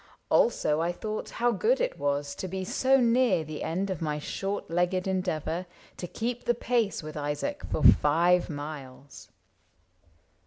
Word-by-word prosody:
Also 160 Hz, -, +3 dB
I 170 Hz, +1 st, +1 dB
thought 215 Hz, +4 st, -5 dB
how 240 Hz, +1 st, +1 dB
good 470 Hz, -, +2 dB
it -, -, -1 dB
was 145 Hz, 0 st, -1 dB
to 185 Hz, -, -5 dB
be 190 Hz, +1 st, -4 dB
So 265 Hz, +7 st, +3 dB
near 235 Hz, -7 st, +3 dB
the 155 Hz, -1 st, -7 dB
end 190 Hz, +4 st, -2 dB
of 180 Hz, -, -4 dB
my 150 Hz, -2 st, -1 dB
short 195 Hz, +6 st, -4 dB
legged 180 Hz, +2 st, 0 dB
endeavor 180 Hz, -2 st, -2 dB, 0.3 s
To 175 Hz, -, -5 dB
keep 240 Hz, +5 st, -4 dB
the 240 Hz, -, +2 dB
pace 230 Hz, -6 st, 0 dB
with 155 Hz, 0 st, -8 dB
Isaac 150 Hz, -, -3 dB
for 155 Hz, -, -1 dB
five 170 Hz, +5 st, +5 dB
miles. 140 Hz, -6 st, -8 dB
180 Hz, 155 wpm, -28 LUFS, 150-230 Hz, 0.3 s, five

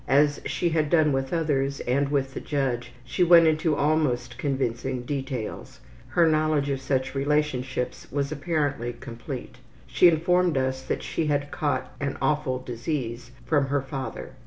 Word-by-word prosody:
As 145 Hz, +1 st, +3 dB
she 175 Hz, -, 0 dB
had 155 Hz, -2 st, +1 dB
done 155 Hz, -2 st, +4 dB
with 135 Hz, 0 st, -1 dB
others, 140 Hz, -5 st, 0 dB
and 140 Hz, +3 st, +1 dB
with 135 Hz, -2 st, 0 dB
the -, -, -4 dB
judge, 125 Hz, -4 st, -2 dB
she 125 Hz, +9 st, +1 dB
went 170 Hz, -1 st, +8 dB
into 155 Hz, 0 st, +2 dB
almost 145 Hz, -5 st, 0 dB
convincing 130 Hz, -2 st, -1 dB
details. 130 Hz, -4 st, -5 dB, 0.3 s
Her 170 Hz, -2 st, +3 dB
knowledge 155 Hz, -2 st, +2 dB
of 135 Hz, -1 st, -2 dB
such 130 Hz, -1 st, -1 dB
relationships 135 Hz, -3 st, -1 dB
was 140 Hz, +1 st, -1 dB
apparently 145 Hz, -6 st, -1 dB
complete. 120 Hz, 0 st, -7 dB, 0.3 s
She 180 Hz, -, +5 dB
informed 175 Hz, 0 st, +3 dB
us 130 Hz, 0 st, 0 dB
that 130 Hz, -, -3 dB
she 160 Hz, -, -2 dB
had 145 Hz, -1 st, 0 dB
caught 145 Hz, -2 st, -2 dB
``an 140 Hz, 0 st, -2 dB
awful 135 Hz, -1 st, +1 dB
disease'' 120 Hz, -1 st, -4 dB, 0.2 s
from 145 Hz, -4 st, +2 dB
her 140 Hz, -1 st, 0 dB
father. 135 Hz, -1 st, -6 dB
140 Hz, 155 wpm, -26 LUFS, 130-155 Hz, 0.3 s, went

